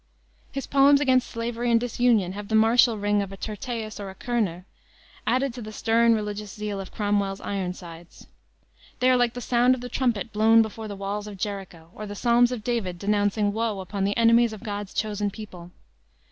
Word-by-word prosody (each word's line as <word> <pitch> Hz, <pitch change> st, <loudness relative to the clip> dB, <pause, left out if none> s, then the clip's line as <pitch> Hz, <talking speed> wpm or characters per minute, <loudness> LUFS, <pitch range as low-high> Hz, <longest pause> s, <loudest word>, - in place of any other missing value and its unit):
His 275 Hz, 0 st, -4 dB
poems 280 Hz, +1 st, +5 dB
against 260 Hz, -3 st, +2 dB
slavery 235 Hz, +1 st, -3 dB
and 230 Hz, -1 st, +4 dB
disunion 235 Hz, -5 st, +1 dB
have 205 Hz, +1 st, -7 dB
the 220 Hz, -, 0 dB
martial 225 Hz, +1 st, +5 dB
ring 205 Hz, 0 st, +1 dB
of 195 Hz, -1 st, -5 dB
a 195 Hz, -, -8 dB
Tyrtaeus 220 Hz, +1 st, -5 dB
or 200 Hz, -1 st, -6 dB
a 190 Hz, -, -10 dB
Körner, 200 Hz, -8 st, -2 dB, 0.6 s
added 260 Hz, 0 st, +1 dB
to 245 Hz, -, -8 dB
the 215 Hz, -1 st, -7 dB
stern 230 Hz, +1 st, +3 dB
religious 210 Hz, -1 st, -4 dB
zeal 210 Hz, -1 st, -4 dB
of 190 Hz, -, -7 dB
Cromwell's 205 Hz, -2 st, -1 dB
Ironsides. 180 Hz, -3 st, -6 dB, 0.7 s
They 255 Hz, +1 st, +4 dB
are -, -, +5 dB
like 245 Hz, -1 st, +1 dB
the 245 Hz, -, -5 dB
sound 245 Hz, +2 st, +3 dB
of 250 Hz, -, -9 dB
the 245 Hz, -, -6 dB
trumpet 235 Hz, -4 st, -1 dB
blown 225 Hz, +2 st, +5 dB
before 220 Hz, 0 st, -7 dB
the 205 Hz, -, -6 dB
walls 200 Hz, +1 st, -4 dB
of 205 Hz, -2 st, -8 dB
Jericho, 185 Hz, -4 st, -6 dB
or 215 Hz, -, -7 dB
the 205 Hz, -, -7 dB
Psalms 240 Hz, +2 st, +3 dB
of 240 Hz, -4 st, -4 dB
David 210 Hz, -7 st, -2 dB
denouncing 205 Hz, +1 st, +1 dB
woe 220 Hz, -2 st, -1 dB
upon 190 Hz, +1 st, -4 dB
the 200 Hz, +1 st, 0 dB
enemies 230 Hz, 0 st, +4 dB
of 215 Hz, -, -10 dB
God's 205 Hz, -3 st, -5 dB
chosen 210 Hz, -1 st, -1 dB
people. 190 Hz, -5 st, -10 dB
215 Hz, 195 wpm, -25 LUFS, 200-235 Hz, 0.7 s, poems